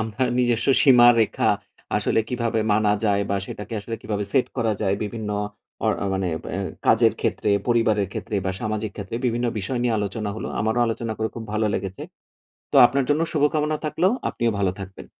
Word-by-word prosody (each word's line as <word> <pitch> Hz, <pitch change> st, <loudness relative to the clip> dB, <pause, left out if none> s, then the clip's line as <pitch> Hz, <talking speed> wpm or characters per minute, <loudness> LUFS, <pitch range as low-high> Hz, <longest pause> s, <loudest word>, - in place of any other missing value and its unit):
আমার 110 Hz, +3 st, -1 dB
নিজস্ব 120 Hz, -1 st, +1 dB, 0.2 s
সীমারেখা, 120 Hz, -4 st, +5 dB, 0.5 s
আসলে -, -, +1 dB
কিভাবে 115 Hz, -2 st, -1 dB
মানা 105 Hz, 0 st, +3 dB
যায়, 100 Hz, -1 st, +2 dB
বা 100 Hz, -, +1 dB
সেটাকে 105 Hz, +2 st, -7 dB
আসলে 115 Hz, +2 st, -5 dB
কিভাবে 105 Hz, -1 st, -2 dB
সেট 130 Hz, -, +3 dB
করা 115 Hz, -3 st, +1 dB
যায় 100 Hz, -2 st, +1 dB
বিভিন্ন 105 Hz, 0 st, -4 dB, 0.5 s
অ -, -, +2 dB, 0.3 s
মানে 95 Hz, -1 st, -1 dB
ব্য -, -, -8 dB, 0.4 s
কাজের -, -, +5 dB
ক্ষেত্রে, -, -, -1 dB, 0.2 s
পরিবারের 110 Hz, -5 st, +2 dB
ক্ষেত্রে, 110 Hz, -1 st, -5 dB
বা -, -, +1 dB
সামাজিক 110 Hz, 0 st, -2 dB
ক্ষেত্রে, 100 Hz, +2 st, -5 dB
বিভিন্ন 120 Hz, 0 st, 0 dB
বিষয় 120 Hz, +6 st, -2 dB
নিয়ে 120 Hz, -2 st, +1 dB
আলোচনা 105 Hz, +1 st, -3 dB
হলো। -, -, -5 dB
আমারও 110 Hz, +3 st, +1 dB
আলোচনা 115 Hz, 0 st, -2 dB
করে 110 Hz, -, 0 dB
খুব 115 Hz, -, -5 dB
ভালো 110 Hz, 0 st, +1 dB
লেগেছে। 95 Hz, 0 st, -4 dB, 0.7 s
তো -, -, -3 dB
আপনার 135 Hz, +3 st, +2 dB
জন্য 150 Hz, +3 st, +2 dB
শুভকামনা 150 Hz, +1 st, +1 dB
থাকল। 155 Hz, +3 st, -2 dB, 0.3 s
আপনিও 115 Hz, -1 st, 0 dB
ভালো 95 Hz, -2 st, +2 dB
থাকবেন। 95 Hz, 0 st, -9 dB
110 Hz, 175 wpm, -23 LUFS, 105-120 Hz, 0.7 s, সীমারেখা